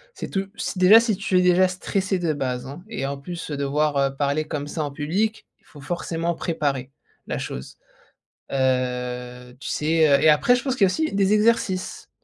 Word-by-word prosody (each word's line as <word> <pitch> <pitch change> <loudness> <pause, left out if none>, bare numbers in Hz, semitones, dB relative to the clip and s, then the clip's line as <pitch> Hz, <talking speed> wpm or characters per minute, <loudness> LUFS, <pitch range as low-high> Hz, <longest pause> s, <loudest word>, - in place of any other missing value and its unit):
c'est - - -5
tout 195 0 -2
c'est 185 - -3
déjà, 200 +5 +8
si 230 -3 0
tu 195 -2 0
es - - +5
déjà 180 +1 +5
stressé 190 +1 -2
de 170 -3 0
base, 125 -3 -3
hein, 140 +6 -9
et 135 - -3
en 140 +1 -2
plus, 165 +2 -7
devoir 140 -1 0
parler 145 +2 0
comme 145 -1 -4
ça 155 +1 -4
en 145 - -3
public, 180 +10 -2
il - - -35
faut 145 - -14
forcément 170 +2 -2
préparer 140 -6 -2 0.4
la - - -3
chose. 65 - -7 0.7
Heu, 125 -1 -2
tu - - -6
sais, 160 +1 +2
heu 140 -1 +5
et 155 - +4
après 245 +12 +4
je 245 - -4
pense 265 -2 0
qu'il 255 - -3
y - - +8
a 185 - +1
aussi 315 0 -1
des 195 0 +2
exercices, 210 -4 +1
155 Hz, 200 wpm, -23 LUFS, 140-185 Hz, 0.7 s, déjà